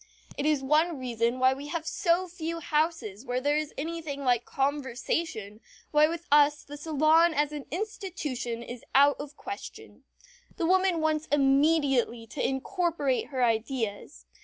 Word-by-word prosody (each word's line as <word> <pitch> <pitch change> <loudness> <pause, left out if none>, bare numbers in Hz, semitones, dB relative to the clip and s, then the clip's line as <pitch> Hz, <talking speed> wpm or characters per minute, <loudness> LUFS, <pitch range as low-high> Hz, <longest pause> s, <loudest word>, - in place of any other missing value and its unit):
It 285 - -1
is 300 -3 +2
one 310 +4 +2
reason 240 -1 -1
why 260 +1 +4
we 280 +2 -8
have 325 +1 -4
so 355 +1 +1
few 335 -1 -5
houses 300 - -1
where 250 -1 -2
there 290 +3 +1
is 305 -1 -1
anything 315 -2 -4
like 245 -2 +2
conversation, 265 -5 -2 0.3
why 300 0 +5
with 335 +1 -5
us 295 0 +5
the 290 - -9
salon 315 +2 +3
as 295 +1 +1
an 295 -2 -7
institution 335 - -4
is 240 0 -9
out 285 +1 +6
of 290 0 -10
question. 395 +1 -9 0.5
The 335 - 0
woman 370 -1 +3
wants 310 0 0
immediately 275 -4 +2
to 285 - -3
incorporate 285 -1 -1
her 260 -3 -1
ideas. 225 - -2
290 Hz, 150 wpm, -28 LUFS, 260-325 Hz, 0.5 s, out